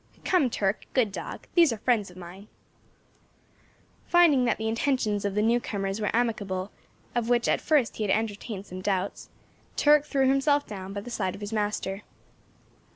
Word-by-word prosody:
"Come, 350 -9 +3
Turk, 200 -2 -1
good 235 -6 +3
dog, - - -7
these 335 -6 +5
are 230 - -3
friends 215 -3 +1
of 180 - -15
mine." 185 +3 -11 1.6
Finding 325 -8 +5
that 235 - +1
the 220 - -3
intentions 225 -3 0
of 200 -1 -2
the 210 - +2
new 235 +2 +3
comers 195 -2 -3
were 210 - 0
amicable, 205 -5 -1 0.4
of 240 -1 -1
which 240 -1 +2
at - - +2
first 295 -7 +1
he 220 - -2
had 205 - -1
entertained 210 -1 -2
some 185 -1 -8
doubts, 190 0 -2 0.5
Turk 295 0 +5
threw 270 -2 +2
himself 285 +2 +2
down 195 -2 -7
by 200 0 -4
the 245 - -9
side 190 -5 -2
of - - -12
his 205 +2 -5
master. 205 -2 -2
215 Hz, 175 wpm, -27 LUFS, 200-250 Hz, 1.6 s, these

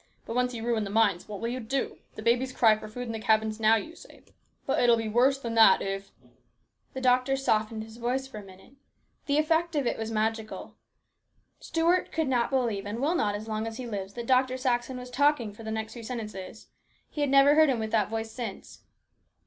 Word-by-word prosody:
But 230 - -5
once 250 0 +1
you 225 0 -5
ruin 230 -2 0
the 200 - -5
mines, 205 -4 +2
what 205 -2 -7
will 230 - -2
you 250 +2 -3
do? 255 +3 -3 0.2
The 215 - -8
babies 245 +3 +2
cry 225 -4 +4
for 215 - -9
food 245 +4 -6
in 230 - -5
the 225 - -4
cabins 220 0 +1
now, 220 0 +5
you 315 +10 -4
say; - - -16 0.4
but 270 - +1
it 245 - +4
will 235 - +6
be 225 -1 -3
worse 250 +5 +3
than 235 -4 -5
that 220 -4 +7
if 195 0 -4 0.4
" - - -45
The 260 - -4
doctor 255 +1 +3
softened 220 -4 0
his 220 +1 -12
voice 250 +3 -1
for 240 -5 -9
a - - -10
minute. 190 +5 -16 0.5
The 285 0 +2
effect 320 +2 +1
of 285 -3 +1
it - - -1
was 225 0 -3
magical. 220 0 -3 0.9
Stuart 335 +2 +1
could 320 -2 -1
not 245 -3 +1
believe, 230 -7 -1
and 210 +3 -4
will 290 +6 +1
not 205 -11 0
as 215 +2 -6
long 215 0 -2
as 225 0 -6
he 255 - -6
lives, 200 -4 -5
that 235 -1 -5
Dr. 255 +1 +2
Saxon 255 0 -1
was 250 0 -9
talking 265 -5 +2
for 210 - -13
the 220 - -6
next 220 0 -4
few 235 - -9
sentences. 220 -4 -7 0.4
He 300 - -5
has 290 - +1
never 275 +1 +6
heard 310 -1 +5
him 260 - +1
with 220 -1 -4
that 210 -3 +2
voice 225 0 -4
since. 230 -5 -7
230 Hz, 230 wpm, -28 LUFS, 220-260 Hz, 0.9 s, that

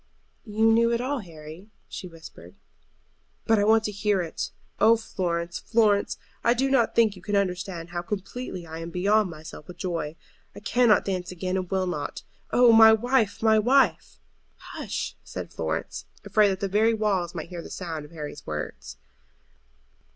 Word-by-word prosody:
"You 220 +1 +3
knew 230 +1 +4
it 235 - +1
all, 265 +3 -1
Harry," 165 0 -11 0.2
she 185 - -7
whispered. 160 - -13 0.9
"But 225 -1 +3
I - - +3
want 220 +1 +4
to 210 - -2
hear 205 -1 0
it. 165 - -4 0.3
Oh, 230 +1 +6
Florence, 170 -5 -3
Florence, 215 -3 +2 0.3
I 235 +1 +4
do 270 +2 0
not 245 -4 +2
think 220 -3 +4
you 185 - -13
can 205 +3 -2
understand 180 -3 -2
how 175 0 -3
completely 195 0 -5
I 160 0 -8
am 165 0 -6
beyond 200 +4 +2
myself 155 -1 -10
with 180 - -10
joy. 165 -4 -3 0.4
I - - -8
cannot 230 +1 +3
dance 185 -2 -3
again, 185 +1 -3
and 185 -2 -2
will 190 -1 0
not. 150 -5 -4 0.3
Oh, 245 -1 +6
my 225 0 +9
wife, 225 -1 +1
my 220 -1 +5
wife!" 260 +5 +2 0.5
"Hush!" - - -4
said - - -7
Florence, - - -3 0.2
afraid 215 -1 +4
that 190 -1 -3
the 200 - 0
very 220 +4 +3
walls 195 -5 0
might 160 - -6
hear 175 -2 -6
the - - -10
sound 165 -5 -5
of 150 - -12
Harry's 150 -3 -8
words. 75 0 -6
195 Hz, 175 wpm, -26 LUFS, 170-220 Hz, 0.9 s, my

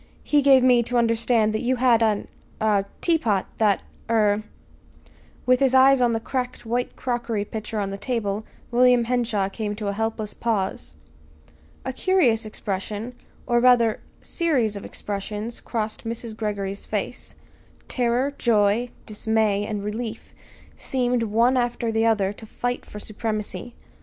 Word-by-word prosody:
He 295 -1 +3
gave 270 -2 +6
me 250 -2 +5
to 240 +1 -1
understand 230 -1 +2
you 245 +4 +1
had 240 -2 +4
an 215 -2 +1 0.3
er 210 -2 +2 0.2
teapot 235 - +2
that 210 -3 +3 0.3
er 210 -2 +3 0.5
" 80 0 -28
With 250 0 +4
his 265 -1 +3
eyes 265 0 +6
on 240 -1 +3
the 225 - 0
cracked 250 +1 -4
white 240 +2 -2
crockery 235 -4 -2
pitcher 215 +1 -5
on 195 -1 -2
the 195 - -6
table, 215 -4 -2 0.3
William 245 0 +5
Henshaw 230 -4 0
came 210 +1 -4
to 210 -1 -3
a - - -1
helpless 220 0 -3
pause. 190 - -2 0.9
A 260 - -2
curious 250 - +2
expression, 210 +3 -4 0.3
or 240 -1 +2
rather, 235 -3 +4 0.2
series 265 - 0
of 200 - -7
expressions 210 +3 -4
crossed 220 -2 -3
Mrs. 230 -1 -5
Greggory's 200 -2 -3
face. - - -4 0.5
Terror, 250 +3 0
joy, 220 +1 +2 0.2
dismay, 215 -1 0
and 205 -2 -3
relief 220 +2 -5 0.4
seemed, 250 -2 0
one 230 +4 +2
after 240 -1 0
the 225 0 +2
other 205 -3 +2
to 220 +1 -12
fight 245 +3 -3
for - - -9
supremacy. 215 +2 -4
225 Hz, 145 wpm, -24 LUFS, 210-245 Hz, 0.9 s, gave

